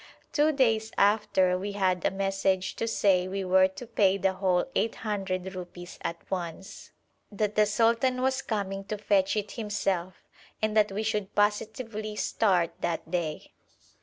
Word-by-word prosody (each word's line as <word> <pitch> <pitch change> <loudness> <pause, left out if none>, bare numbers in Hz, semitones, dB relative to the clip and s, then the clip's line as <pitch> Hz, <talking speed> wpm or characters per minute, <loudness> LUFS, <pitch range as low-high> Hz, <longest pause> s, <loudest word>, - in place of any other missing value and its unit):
Two 305 0 +4
days 225 -6 +2
after 200 -3 +3
we 200 +2 -4
had 185 -3 +1
a - - +3
message 195 -1 0
to 230 - -1
say 190 -5 +2
we 195 0 -3
were 185 +1 +5
to 190 +6 -9
pay 200 -4 +2
the 190 -1 +1
whole 185 -2 +1
800 195 -4 -2
rupees 175 -1 -9
at 170 - -3
once, 185 +2 -5 0.4
that 210 0 -1
the 210 0 +4
sultan 235 +4 +2
was 265 +1 +1
coming 195 -4 -3
to 215 - -4
fetch 200 -1 +2
it 210 -1 -2
himself, 195 -5 -2 0.4
and 215 0 0
that 210 -2 +4
we 205 +3 -2
should 210 -3 -2
positively 215 +1 -1
start 185 -6 +1
that 165 -1 -3
day. 165 -4 -3
200 Hz, 155 wpm, -28 LUFS, 185-215 Hz, 0.4 s, were